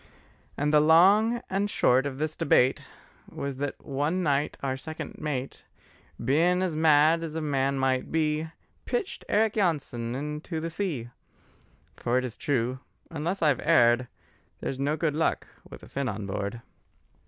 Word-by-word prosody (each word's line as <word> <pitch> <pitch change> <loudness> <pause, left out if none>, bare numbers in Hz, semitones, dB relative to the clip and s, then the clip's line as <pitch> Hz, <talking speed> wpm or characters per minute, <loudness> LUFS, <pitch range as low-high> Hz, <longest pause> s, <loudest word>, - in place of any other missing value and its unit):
And 150 +1 0
the 150 - +7
long 200 +9 +5
and 200 +2 -1
short 130 -6 +3
of 135 -2 -6
this 155 +1 -2
debate 130 -2 +2 0.4
Was 140 -2 -5
that 140 0 -5
one 150 +7 -1
night 145 -1 0
our 130 -1 -1
second 155 +4 -7
mate, 140 -4 -4 0.6
Bein' 165 +9 +2
as 175 -4 -1
mad 155 +1 +4
as 160 -2 -5
a - - -1
man 140 -3 0
might 130 -1 0
be, 155 0 0 0.4
Pitched 450 -6 -3
Eric 215 +1 +2
Jansen 135 - -1
into 150 +4 -4
the 165 +1 -4
sea: 155 - -3 0.9
For 120 +1 0
it 130 - 0
is 120 -2 -6
true, 130 -3 -1 0.3
unless 165 +4 -2
I've 145 -5 +3
erred, 125 -5 +4 0.5
There's 135 - -4
no 145 +3 0
good 160 -2 0
luck 160 +2 0 0.2
with - - -11
a - - -11
Finn 135 -2 -2
on 105 0 -5
board. 100 +3 -4
150 Hz, 155 wpm, -27 LUFS, 130-165 Hz, 0.9 s, the